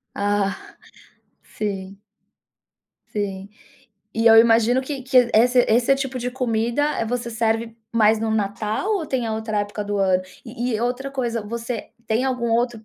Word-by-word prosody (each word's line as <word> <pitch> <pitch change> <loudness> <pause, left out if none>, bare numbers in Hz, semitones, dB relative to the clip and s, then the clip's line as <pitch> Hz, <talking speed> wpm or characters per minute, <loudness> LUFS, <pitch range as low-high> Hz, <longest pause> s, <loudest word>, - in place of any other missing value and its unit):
Ah, 200 -1 -1 0.7
sim. 195 -2 -5 1.1
Sim. 200 -1 -4 0.7
E 225 +1 0
eu 225 -1 +8
imagino 230 +2 +5
que 270 0 -5
que 250 -2 +4
esse 245 +3 +5
esse 240 +4 +4
tipo 270 -1 -3
de 250 0 -3
comida, 240 0 -1 0.2
eh, - - 0
você 235 +1 -3
serve 225 0 -1 0.2
mais 220 -1 +4
no 220 0 -2
Natal 215 - -1
ou 330 -5 -4
tem 255 -4 -1
a 220 - -2
outra 220 -1 -2
época 205 0 -4
do 205 0 -2
ano? 185 -1 +2 0.2
E 240 0 -3
e 215 - -1
outra 250 +3 -2
coisa 240 -4 -2
você 230 +2 -5 0.2
tem 225 +4 +1
algum 250 -3 -1
outro 235 -1 0
230 Hz, 160 wpm, -22 LUFS, 215-245 Hz, 1.1 s, eu